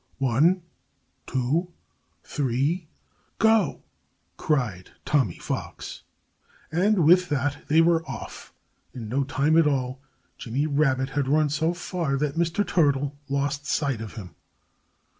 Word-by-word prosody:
"One, 145 +8 +2 0.6
two, 150 +8 -1 0.5
three 145 +5 -1 0.5
go!" 220 -8 +3 0.5
cried 120 - -1 0.2
Tommy 130 - +1
Fox. - - -5 0.7
And 180 +1 +3
with 180 +2 +5
that 145 0 -2
they 160 +2 +5
were 165 0 +3
off. - - -8 0.4
In 115 -4 -6
no 135 +4 +1
time 140 +3 +1
at 160 - +4
all 130 -2 -1 0.4
Jimmy 130 +5 -1
Rabbit 140 -3 +1
had 145 -1 -1
run 150 +2 +3
so 160 +4 0
far 170 -5 -2
that 145 0 -1
Mr. 170 +4 0
Turtle 145 -4 +2
lost 140 +1 -1
sight 140 -6 0
of 110 - -8
him. 95 -6 -8
145 Hz, 120 wpm, -25 LUFS, 135-165 Hz, 0.7 s, with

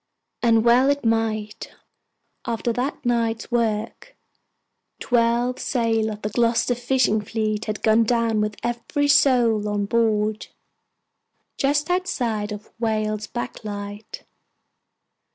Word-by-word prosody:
And 230 -1 +3
well 250 +3 +5
it 285 -3 0
might, 220 -2 -1 0.7
after 230 0 -1
that 265 +3 -3
night's 230 -1 -1
work. 230 - -2 0.8
Twelve 240 +1 +1
sail 225 -3 0
of 210 -1 -7
the 210 - -1
Gloucester 235 +2 +1
fishing 245 -3 +1
fleet 215 0 -2
had 215 -1 -4
gone 220 +1 +4
down 230 -2 +1
with 210 0 -2
every 240 +5 -1
soul 235 -7 +3
on 205 -1 -1
board, 215 -1 0 1.1
just 290 +3 0
outside 240 - -1
of 210 0 -8
Whale's 215 -2 -1
back 240 -1 -6
Light. 205 0 -7
225 Hz, 115 wpm, -23 LUFS, 215-240 Hz, 1.1 s, well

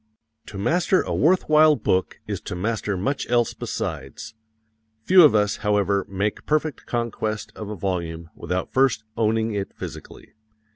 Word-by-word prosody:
To 100 - -8
master 175 - +2
a - - -3
worth 180 +4 +2
while 155 0 +6
book 95 -6 -1
is - - -4
to - - -6
master 105 +1 -2
much 135 +9 -2
else 120 -1 +2
besides; 65 - -5 0.7
few 185 +4 +7
of 150 -7 +6
us, 105 0 +2
however, 100 -2 +1
make 100 +2 -3
perfect 155 -1 -1
conquest 110 -2 -3
of 105 -2 -7
a 105 - -4
volume 85 -3 -4
without 90 +2 -4
first 130 -4 +2
owning 110 0 +1
it 100 -1 -4
physically. - - -10
110 Hz, 150 wpm, -23 LUFS, 100-130 Hz, 0.7 s, few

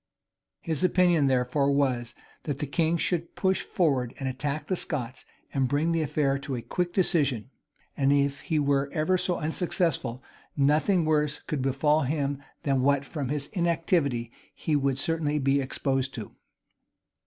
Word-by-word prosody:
His 160 -2 -2
opinion 175 -5 +4
therefore 130 +2 +2
was, 125 -4 0 0.3
that 145 -3 -2
the 150 - -2
king 160 +4 +1
should 170 0 -1
push 190 -1 +1
forward 135 -9 0
and 135 - -3
attack 140 +3 -3
the 185 - -1
Scots, 130 -7 -4 0.3
and 135 -2 +1
bring 145 +5 +1
the 165 -1 +1
affair 140 -2 0
to 135 -1 -4
a 120 - -5
quick 180 -1 -2
decision; 145 - +1 0.4
and, 135 -1 +2
if 140 0 +2
he 160 - -1
were 140 -1 +1
ever 160 +4 +2
so 180 -1 +1
unsuccessful, 155 -6 -1 0.3
nothing 155 +5 +3
worse 150 -1 +1
could 150 -3 -3
befall 140 +3 +2
him 140 0 -1 0.2
than 135 -2 +1
what 140 +1 +2
from 140 -3 -4
his 145 -1 -1
inactivity 165 - 0 0.2
he 155 - -1
would 140 -2 +1
certainly 150 0 0
be 140 0 +2
exposed 135 0 -1
to. 110 -4 -7
145 Hz, 155 wpm, -27 LUFS, 135-160 Hz, 0.4 s, opinion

